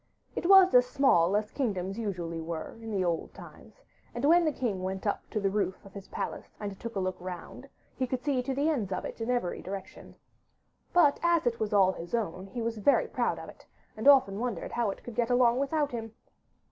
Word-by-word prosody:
It - - -2
was 385 -1 +8
as 250 0 +6
small 205 - +3
as 210 0 -3
kingdoms 195 -6 -2
usually 175 -6 -3
were 160 0 -5
in 215 -4 -2
old 170 -2 -2
times, - - -14 0.3
and 240 +3 -1
when 340 +3 +5
the 310 - +2
king 225 -9 -2
went 190 +2 -4
up 205 - -2
to 215 - -2
the 195 -1 0
roof 200 -2 -2
of 195 - -14
his 200 -1 -9
palace - - -6
and 200 -2 -6
took 230 -1 -7
a - - 0
look 185 -1 -2
round 185 +9 -8 0.3
he 255 - -1
could 250 0 -3
see 280 -3 +1
to 265 +1 -3
the 285 +3 +1
ends 235 -12 0
of 185 - -3
it - - -7
in 225 - -3
every 245 -8 -1
direction. 190 0 -8 0.8
But 315 -5 +4
as 340 -3 +2
it 235 -1 0
was 215 -1 -1
all 195 -2 +5
his 175 +2 -5
own, 195 -4 -3
he 235 +3 -5
was 230 -1 -3
very 275 +7 +3
proud - - -1
of - - -8
it, - - -14 0.3
and 220 +5 -2
often 260 -8 +6
wondered 235 -7 -3
how 235 -3 0
it 195 - -7
would 240 - -7
get 235 +1 0
along 245 0 +4
without 290 +1 0
him. 225 -2 -6
225 Hz, 225 wpm, -29 LUFS, 190-260 Hz, 0.8 s, was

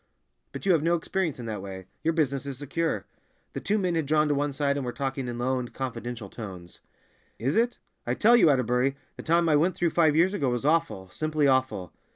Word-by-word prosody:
But - - -7
you 195 - +4
have 165 -4 +4
no 170 +2 +2
experience 170 -1 -2
in 120 - -7
that 105 -3 -4
way; 95 -1 -8 0.2
your 165 0 +1
business 140 -4 0
is 135 -2 -5
secure." 145 +4 -2 0.5
The - - -3
two 210 - +1
men 185 -4 0
had 160 -4 -1
drawn 155 +1 +3
to - - +3
one 145 +1 0
side 140 0 0
and 140 - -2
were 125 - -3
talking 135 0 -3
in 120 -1 -4
low 130 +2 0
and 125 -1 -6
confidential 120 -4 -5
tones. 95 -5 -9 0.6
"Is 130 +7 -1
it? 235 +2 +2 0.3
I - - +1
tell 230 +3 +5
you, 225 -9 +6
Atterbury, 125 0 +2 0.2
the - - -7
time 170 +1 +2
I 155 - +4
went 170 +5 +2
through 170 -2 +1
five 160 -3 +3
years 175 +5 +4
ago 140 -10 0
was 120 +1 -2
awful, 150 - +1
simply 155 +2 0
awful. 130 - +1
140 Hz, 225 wpm, -27 LUFS, 125-165 Hz, 0.6 s, you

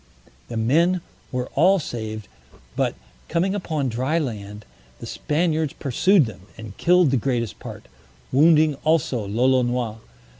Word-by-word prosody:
The 115 - -5
men 165 +11 +2 0.3
were 125 0 -3
all 185 +7 +4
saved, 110 - -5 0.5
but - - 0 0.3
coming 180 +3 +1
upon 160 -8 -2
dry 130 +7 -1
land, 105 -8 -5 0.3
the - - -9
Spaniards 155 -1 -1
pursued 165 - +3
them, 95 -4 -10
and 110 -3 -9
killed 175 -4 +4
the 135 - +3
greatest 120 -2 -2
part, - - -9 0.4
wounding 155 +2 +5
also 140 -9 +1
Lolonois. 120 0 +1
130 Hz, 125 wpm, -23 LUFS, 115-160 Hz, 0.5 s, wounding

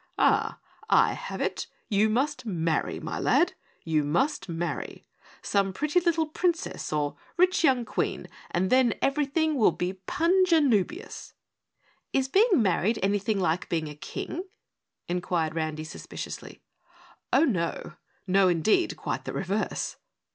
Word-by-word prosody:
Ah, - - +2 0.3
I - - +5
have - - -6
it! - - -2 0.2
You 215 +1 +3
must 270 +7 0
marry, 165 - -1
my - - -4
lad, - - +3 0.3
you 155 -2 +1
must 195 - 0
marry! 170 +1 -4 0.4
Some 195 -1 +1
pretty 300 - +1
little 335 -2 +1
Princess 335 +2 -2
or 150 -1 -1 0.2
rich 365 0 +3
young 260 -6 +3
Queen, - - -2 0.2
and 185 +2 0
then 255 -3 +4
everything 300 +3 +1
will 230 -10 +4
be 185 +1 -4
punjanoobious!" 330 - +1 0.8
"Is 270 -1 +2
being 405 - +4
married 195 +4 +1
anything 200 +1 +1
like 175 -1 0
being 160 -2 -1
a 150 - -9
King?" 335 - -5 0.6
inquired 175 -2 -1
Randy 155 -1 -2
suspiciously. 155 - -8 0.7
"Oh, 325 - +5
no. 170 - -2 0.3
No, 190 0 +4
indeed, 180 - +2
quite - - -4
the - - -4
reverse." 195 +3 -2
210 Hz, 130 wpm, -27 LUFS, -, 0.8 s, I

